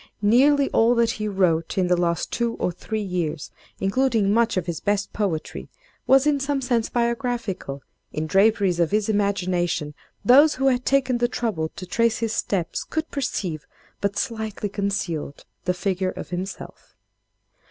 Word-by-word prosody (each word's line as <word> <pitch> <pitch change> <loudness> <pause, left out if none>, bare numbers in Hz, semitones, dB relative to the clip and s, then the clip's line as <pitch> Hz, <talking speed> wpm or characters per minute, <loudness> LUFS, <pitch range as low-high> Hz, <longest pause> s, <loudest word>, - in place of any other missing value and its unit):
Nearly 275 +6 +5
all 230 +2 +4
that 235 -1 +3
he 215 0 -4
wrote 180 -5 +1
in 185 - +3
the 180 0 +3
last 170 -1 -1
two 235 -1 -1
or - - -1
three 215 +5 -4
years—including 195 - -1
much 230 -2 +2
of 180 - 0
his 170 -3 -3
best 205 0 -1
poetry—was 260 - -1
in 295 -2 +2
some 275 0 -1
sense 245 -3 0
biographical; 235 - -2 0.3
in 155 +1 -3
draperies 195 0 +3
of 170 -2 +3
his 210 0 0
imagination, 180 -6 0 0.3
those 285 +7 +7
who 270 +1 +2
had 250 -1 0
taken 260 -3 +2
the 240 - +3
trouble 210 -10 -2
to 185 - -7
trace 230 +4 +1
his 225 -1 -2
steps, 190 -6 -2
could 315 0 -4
perceive, 185 - -3 0.3
but 200 0 -1
slightly 220 -3 -3
concealed, 195 -7 -3 0.2
the 180 - +2
figure 185 0 -1
of - - -7
himself." 185 +2 -7
205 Hz, 150 wpm, -23 LUFS, 180-240 Hz, 0.3 s, those